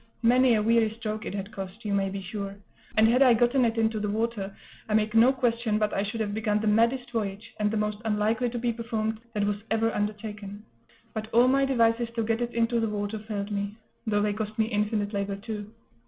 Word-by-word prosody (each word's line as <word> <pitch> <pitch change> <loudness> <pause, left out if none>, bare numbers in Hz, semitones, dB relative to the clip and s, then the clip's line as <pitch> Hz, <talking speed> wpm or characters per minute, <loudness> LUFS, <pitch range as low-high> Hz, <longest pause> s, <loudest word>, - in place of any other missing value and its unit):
Many 245 +1 +5
a 210 - +1
weary 225 0 +4
stroke 215 -1 -4
it - - -4
had 200 +1 -5
cost, 195 +2 -8
you 205 - -1
may 195 -1 +1
be 195 0 -5
sure; 200 +1 -5 0.4
and 220 0 +6
had 245 +3 +3
I 250 -3 +7
gotten 245 +3 +3
it 230 0 0
into 220 -1 +1
the 210 0 -2
water, 215 -2 -2 0.4
I 210 - +2
make 215 0 +2
no 230 +3 +6
question 235 -4 0
but 210 -1 0
I - - +1
should 220 +3 -3
have 205 -2 -2
begun 210 -1 0
the 220 - -3
maddest 235 +4 +2
voyage, 215 -1 -4
and 210 0 +2
the 220 - -1
most 210 0 -1
unlikely 220 +3 +1
to 240 - -4
be 235 0 0
performed, 220 -1 -2 0.2
that 205 - +1 0.3
ever 225 0 +1
was 225 - +1
undertaken. 210 -1 -4 0.5
But 220 0 -5
all 240 +2 +5
my 275 +1 +4
devices 230 -3 +2
to 230 - 0
get 225 +1 0
it 240 0 -3
into 235 0 +2
the 225 -1 0
water 205 +1 -3
failed 210 -1 -4
me; 200 0 -2 0.3
though 205 -1 +2
they 210 -1 +1
cost 215 0 -4
me 220 - +3
infinite 210 -1 -1
labor, 200 0 -1
too. 210 0 -6
220 Hz, 230 wpm, -27 LUFS, 210-230 Hz, 0.5 s, I